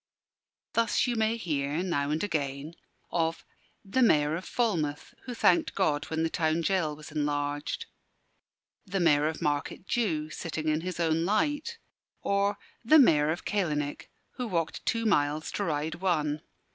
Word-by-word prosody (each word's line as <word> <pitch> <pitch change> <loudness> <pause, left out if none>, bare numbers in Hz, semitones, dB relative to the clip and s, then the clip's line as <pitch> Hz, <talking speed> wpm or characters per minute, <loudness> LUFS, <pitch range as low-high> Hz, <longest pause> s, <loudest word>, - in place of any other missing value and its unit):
Thus 230 -1 +2
you 245 -2 0
may 220 +1 +1
hear, 150 -4 -1
now 145 -6 0
and 155 +4 0
again, 145 -4 -2 0.4
of 165 -1 -1 0.4
"the 230 +7 0
Mayor 150 -9 +4
of 180 - -5
Falmouth, 165 -12 -1
who 245 - -5
thanked 180 -6 +3
God 145 -1 +1
when 160 0 -2
the 165 - +1
town 160 -1 +1
gaol 165 -4 0
was 155 +1 -11
enlarged," 145 -1 -2 1.0
"the 195 0 -2
Mayor 150 -3 +4
of 160 +2 -4
Market 145 +4 -1
Jew, 160 -11 -1
sitting 160 -1 -4
in 155 +1 +1
his 180 0 -5
own 165 -1 +2
light," 290 - 0 0.5
or 200 0 +1 0.3
"the 305 +7 +6
Mayor 155 - +5
of 170 +3 -2
Calenich, 150 -8 -1 0.3
who 250 -2 -2
walked 170 -5 -2
two 230 -1 +1
miles 150 -6 +1
to 205 - -2
ride 155 -2 -1
one." 155 -4 0
165 Hz, 155 wpm, -29 LUFS, 150-200 Hz, 1.0 s, the